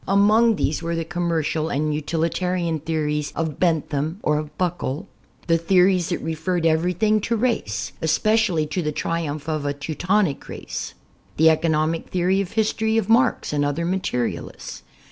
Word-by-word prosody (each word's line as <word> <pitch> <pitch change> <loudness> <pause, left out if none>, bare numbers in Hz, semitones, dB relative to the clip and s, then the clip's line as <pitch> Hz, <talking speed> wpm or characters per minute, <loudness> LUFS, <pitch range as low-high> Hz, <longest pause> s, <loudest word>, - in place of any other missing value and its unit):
Among 215 +4 +4
these 155 -5 -1
were 170 0 -2
the 165 -1 -2
commercial 165 -2 -1
and 150 +2 0
utilitarian 165 +2 -1
theories 150 -1 -2
of 160 -3 -3
Bentham 160 -1 0
or 150 0 +2
of 155 0 -8
Buckle, 175 -5 -2 0.4
the 165 -1 +2
theories 180 0 +3
that - - -2
re 160 - -2
ferred 170 +1 -1
everything 180 +7 +2
to 230 +3 0
race, 105 - -1
especially 180 +1 +2
to 155 +5 -2
the 150 -2 -1
triumph 155 -1 -3
of 155 -2 -1
a 145 0 -2
Teutonic 165 +3 -1
race, - - -6 0.4
the 160 +1 +6
economic 160 0 0
theory 185 +2 +1
of 190 - -6
history 220 0 +1
of 220 -2 0
Marx 245 - +3
and 145 -1 +1
other 145 +4 -1
materialists. 170 -10 -3
165 Hz, 155 wpm, -23 LUFS, 155-185 Hz, 0.4 s, the